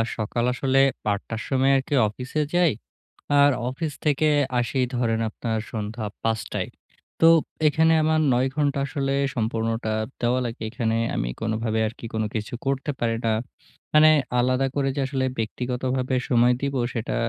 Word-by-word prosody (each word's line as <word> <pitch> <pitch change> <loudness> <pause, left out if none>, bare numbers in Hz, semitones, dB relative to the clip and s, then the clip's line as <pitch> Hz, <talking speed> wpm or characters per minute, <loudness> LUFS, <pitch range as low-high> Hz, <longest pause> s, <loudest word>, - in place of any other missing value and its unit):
সকাল 115 +2 -2
আসলে 135 +1 +1 0.3
৮ 100 0 -1
টার 115 0 -3
সময় 135 0 +2
আরকি 135 +2 -3
অফিসে 125 +8 -3
যাই। 175 -3 +4 0.7
আর 140 0 +6 0.2
অফিস 150 +4 -3
থেকে 150 0 +2 0.3
আসি 120 +2 -1 0.2
ধরেন 115 -2 0
আপনার 115 0 -3
সন্ধ্যা 110 0 -4 0.2
৫ 110 -1 0
টায়। - - -2 0.5
তো 165 - +6 0.4
এখানে 160 +2 +3
আমার 155 0 +2
৯ 125 +2 +2
ঘন্টা 145 -2 +1
আসলে 135 -1 -2 0.2
সম্পূর্ণটা 115 -1 -1 0.3
দেওয়া 125 +1 +1
লাগে। 115 0 -5
এখানে 115 -2 -1 0.2
আমি - - -1
কোনোভাবে 110 0 -1
আর 110 - -4
কি - - -7
কোন 110 - 0
কিছু 110 +1 -4
করতে 135 +2 -1
পারি 115 -1 +1
না। 115 - +2 0.6
মানে 155 +1 +8 0.3
আলাদা 130 +2 +2
করে 140 -1 +1
যে - - 0
আসলে 135 -1 -1
ব্যক্তিগতভাবে 125 +3 -2
সময় 120 0 +4
দিবো 140 -1 -1 0.2
সেটা 115 -1 -3
125 Hz, 155 wpm, -24 LUFS, 115-140 Hz, 0.7 s, মানে